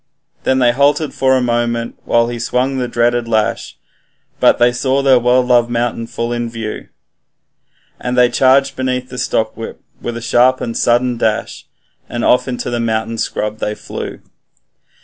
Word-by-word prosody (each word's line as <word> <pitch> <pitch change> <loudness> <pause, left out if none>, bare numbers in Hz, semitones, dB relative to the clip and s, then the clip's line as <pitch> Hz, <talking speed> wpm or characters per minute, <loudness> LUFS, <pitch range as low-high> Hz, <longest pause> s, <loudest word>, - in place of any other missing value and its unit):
Then 130 - +2
they 125 -2 +4
halted 145 +4 +1
for 130 0 +2
a 130 - 0
moment, 120 -1 -1
while 115 0 +2
he 120 -1 -5
swung 125 +3 -1
the 125 - -1
dreaded 120 0 0
lash, 110 -2 -1 0.6
But - - +4
they 120 0 +4
saw 130 +2 0
their 130 -2 +5
well 125 +1 +3
loved 120 -1 +3
mountain 120 -1 -2
full 115 +1 -3
in 120 -1 -2
view, 115 -2 -6 1.1
And 125 0 -3
they 125 0 +6
charged 135 +2 +3
beneath 130 -1 -2
the 125 - -6
stockwhip 110 -1 -2 0.2
with 120 -1 -4
a - - -4
sharp 125 +2 +3
and 115 - -4
sudden 120 0 +1
dash, 110 -2 -2 0.4
And 120 0 -2
off 125 - +3
into 125 -1 -3
the 120 - -1
mountain 115 0 -2
scrub 105 0 -3
they 105 -1 -2
flew. - - -7
120 Hz, 170 wpm, -16 LUFS, 115-125 Hz, 1.1 s, they